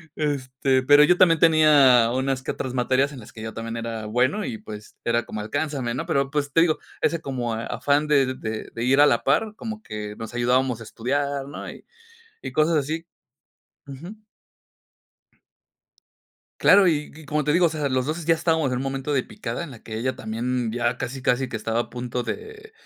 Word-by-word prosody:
este, 130 Hz, -2 st, 0 dB
pero 145 Hz, +2 st, +7 dB
yo 180 Hz, +4 st, +4 dB
también 165 Hz, -3 st, +5 dB
tenía 145 Hz, -8 st, +6 dB
unas 130 Hz, 0 st, -1 dB
que 130 Hz, -, -3 dB
otras 130 Hz, -1 st, -5 dB
materias 130 Hz, +3 st, +1 dB
en 135 Hz, -, -9 dB
las 105 Hz, -, -13 dB
que 110 Hz, -, -10 dB
yo 110 Hz, 0 st, -6 dB
también 115 Hz, 0 st, -5 dB
era 115 Hz, -1 st, -5 dB
bueno 130 Hz, -, +1 dB
y, 110 Hz, -, -4 dB
pues 105 Hz, -1 st, -11 dB
era 120 Hz, 0 st, 0 dB
como 105 Hz, -, -5 dB
"alcánzame", 135 Hz, +1 st, -2 dB
¿no?, 130 Hz, -, -3 dB
pero, 140 Hz, 0 st, 0 dB
pues 145 Hz, -2 st, -2 dB
te 165 Hz, -, +5 dB
digo, 160 Hz, -2 st, +2 dB, 0.2 s
ese 170 Hz, -1 st, +1 dB
como 125 Hz, -5 st, -3 dB
afán 130 Hz, +6 st, 0 dB
de 135 Hz, -3 st, +3 dB
de 110 Hz, -2 st, -5 dB
de 115 Hz, -, -4 dB
ir 135 Hz, +3 st, +4 dB
a -, -, +8 dB
la 120 Hz, -, +2 dB
par, 215 Hz, +10 st, +1 dB
como 220 Hz, -2 st, -6 dB
que 105 Hz, -1 st, -6 dB
nos 110 Hz, +1 st, -7 dB
ayudábamos 125 Hz, 0 st, +1 dB
a -, -, -6 dB
estudiar, 140 Hz, +5 st, -2 dB
¿no?, 145 Hz, -, -7 dB
y -, -, -12 dB, 0.6 s
y -, -, -6 dB
cosas 155 Hz, +1 st, +3 dB
así. 155 Hz, +3 st, -2 dB, 0.8 s
Ujú. 160 Hz, +10 st, -9 dB, 2.4 s
Claro 195 Hz, -2 st, +6 dB
y 150 Hz, -3 st, 0 dB
y 155 Hz, +1 st, -13 dB
como 150 Hz, +1 st, -1 dB
te 150 Hz, -, +1 dB
digo, 175 Hz, +3 st, +4 dB
o -, -, +3 dB
sea, 150 Hz, -3 st, -2 dB
los 130 Hz, -1 st, 0 dB
2 155 Hz, +3 st, -3 dB
ya 165 Hz, -, +5 dB
estábamos 160 Hz, -4 st, +1 dB
en 125 Hz, -, -1 dB
un 130 Hz, -, -3 dB
momento 135 Hz, +1 st, -3 dB
de 130 Hz, -3 st, +1 dB
picada 115 Hz, +7 st, -5 dB
en 150 Hz, -, -8 dB
la 115 Hz, -, -11 dB
que 110 Hz, -1 st, -6 dB
ella 130 Hz, +3 st, -2 dB
también 115 Hz, +1 st, -2 dB
ya 120 Hz, 0 st, -1 dB
casi, 130 Hz, +1 st, -5 dB
casi 130 Hz, +1 st, +1 dB
que 115 Hz, -, -3 dB
estaba 110 Hz, +1 st, -1 dB
a -, -, -9 dB
punto 125 Hz, 0 st, -4 dB
de, 440 Hz, 0 st, -7 dB
135 Hz, 205 wpm, -24 LUFS, 120-150 Hz, 2.4 s, a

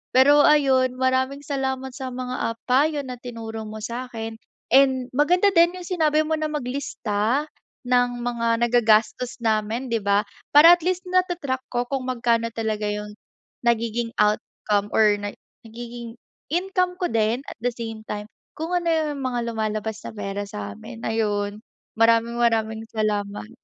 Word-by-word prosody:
Pero 285 Hz, +3 st, +7 dB
ayun, 265 Hz, -4 st, +4 dB
maraming 260 Hz, +2 st, 0 dB
salamat 265 Hz, -2 st, -2 dB
sa 260 Hz, 0 st, -6 dB
mga, 255 Hz, 0 st, -4 dB
ah, 230 Hz, -, -1 dB
payo 285 Hz, +3 st, +2 dB
na 250 Hz, -2 st, -7 dB
tinuro 225 Hz, -3 st, -7 dB
mo 215 Hz, 0 st, -8 dB
sa'kin 230 Hz, -2 st, -5 dB, 0.3 s
and 260 Hz, -1 st, +4 dB
maganda 355 Hz, +9 st, +3 dB
din 345 Hz, 0 st, +4 dB
yung 365 Hz, -, -7 dB
sinabi 310 Hz, -4 st, +2 dB
mo 315 Hz, 0 st, -1 dB
na 310 Hz, -, 0 dB
maglista 250 Hz, -4 st, -1 dB, 0.4 s
ng 245 Hz, -1 st, +1 dB
mga 230 Hz, -1 st, 0 dB
nagagastos 235 Hz, +1 st, +2 dB
namin 225 Hz, +3 st, 0 dB
di 230 Hz, -, +2 dB
ba, 200 Hz, +1 st, +2 dB, 0.3 s
para 320 Hz, +3 st, +10 dB
at 350 Hz, -, +2 dB
least 365 Hz, +2 st, -1 dB
nata-track 355 Hz, -8 st, 0 dB
ko 240 Hz, -1 st, -1 dB
kung 260 Hz, 0 st, -3 dB
magkano 235 Hz, -2 st, +1 dB
talaga 215 Hz, -2 st, -1 dB
yung, 210 Hz, 0 st, -4 dB, 0.5 s
nagiging 235 Hz, 0 st, 0 dB
outcome 210 Hz, -1 st, 0 dB
or 210 Hz, -2 st, +5 dB
na 205 Hz, 0 st, -5 dB, 0.3 s
nagiging 235 Hz, 0 st, -8 dB, 0.4 s
income 365 Hz, 0 st, 0 dB
ko 360 Hz, -1 st, -2 dB
din 225 Hz, +3 st, +1 dB
at -, -, -12 dB
the 245 Hz, +1 st, -1 dB
same 225 Hz, -2 st, -6 dB
time, 210 Hz, 0 st, -5 dB, 0.3 s
kung 320 Hz, +3 st, -4 dB
ano 350 Hz, -1 st, 0 dB
yung 310 Hz, -3 st, 0 dB
mga 250 Hz, -1 st, -1 dB
lumalabas 215 Hz, -1 st, -3 dB
na -, -, -5 dB
pera 205 Hz, 0 st, -4 dB
samin 105 Hz, -, -8 dB
ayun. 210 Hz, -2 st, -1 dB, 0.4 s
Maraming-maraming 230 Hz, -1 st, +2 dB
salamat. 210 Hz, -1 st, -2 dB
240 Hz, 145 wpm, -23 LUFS, 220-275 Hz, 0.5 s, para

